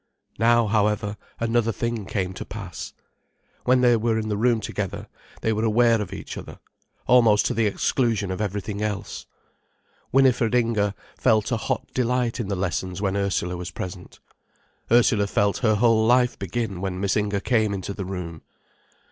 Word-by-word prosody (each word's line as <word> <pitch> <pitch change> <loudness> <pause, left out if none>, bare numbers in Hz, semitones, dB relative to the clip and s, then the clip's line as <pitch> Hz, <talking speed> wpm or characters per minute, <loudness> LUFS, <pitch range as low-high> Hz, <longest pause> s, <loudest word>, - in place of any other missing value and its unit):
Now, 120 +1 +4
however, 105 -1 +1 0.2
another 115 0 +1
thing 115 -1 -3
came 95 -2 -2
to - - -6
pass. - - -7 0.7
When 125 0 +4
they 120 -1 +5
were 115 0 +1
in 110 -1 -2
the 105 - 0
room 115 +2 +2
together, 100 -3 -4 0.4
they 110 - +1
were 110 +1 -1
aware 115 0 +3
of 95 -3 -5
each 100 - -7
other, - - -10 0.5
almost 115 -4 +5
to - - +1
the 115 -1 +2
exclusion 105 -1 0
of 95 - -3
everything 105 0 -3
else. 105 -1 -4 0.8
Winifred 125 -3 +3
Inger 110 -4 +1 0.2
felt 110 0 +2
a 120 - +2
hot - - -2
delight 125 -1 0
in 115 - -2
the 100 - -1
lessons 90 0 -2
when 100 -1 -1
Ursula 95 -3 -1
was 90 0 -5
present, 90 0 -8 0.7
Ursula 115 -3 +4
felt 100 0 +1
her 110 -3 +3
whole 115 0 +4
life 125 0 +3
begin 100 0 -3
when 95 -1 -3
Miss 100 0 0
Inger 105 -1 0
came 110 -1 +1
into 100 0 -4
the 100 - -5
room. 90 -4 -6
105 Hz, 165 wpm, -24 LUFS, 100-115 Hz, 0.8 s, they